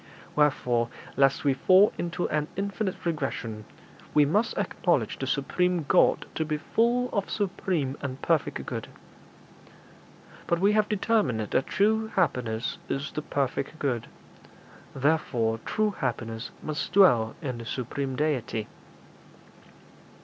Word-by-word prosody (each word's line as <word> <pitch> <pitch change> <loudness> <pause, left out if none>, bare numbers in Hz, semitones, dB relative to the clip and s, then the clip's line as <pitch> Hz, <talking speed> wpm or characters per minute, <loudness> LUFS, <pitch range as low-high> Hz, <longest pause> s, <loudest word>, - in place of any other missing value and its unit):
Wherefore, 125 -5 +2 0.3
lest 135 0 +3
we 140 -2 +3
fall 185 +9 +5
into 175 +1 -2
an 150 0 0
infinite 200 -1 -3
regression, 125 -9 -3 0.5
we 150 -1 +6
must 205 +11 +1
acknowledge - - 0
the - - -3
supreme 180 -3 0
God 180 - +4
to 160 - -1
be 155 -1 -2
full 240 +9 +1
of 200 -2 -1
supreme 180 -8 -1
and 135 -1 -4
perfect 165 -4 0
good. - - -5 1.6
But 170 - +2
we 200 +3 +4
have 210 0 +2
determined 205 - +1
that 110 +5 0
true 220 +2 +2
happiness 125 -10 0
is 140 +3 -2
the 150 - -3
perfect 140 +2 -2
good; 130 -7 -1 0.9
therefore 130 -6 +1
true 215 -1 +1
happiness 115 - -3
must 155 -1 -3
dwell 120 - +5
in 130 -7 -4
the 115 - -7
supreme 130 +2 -3
Deity.' 125 -7 -1
150 Hz, 125 wpm, -27 LUFS, 125-190 Hz, 1.6 s, we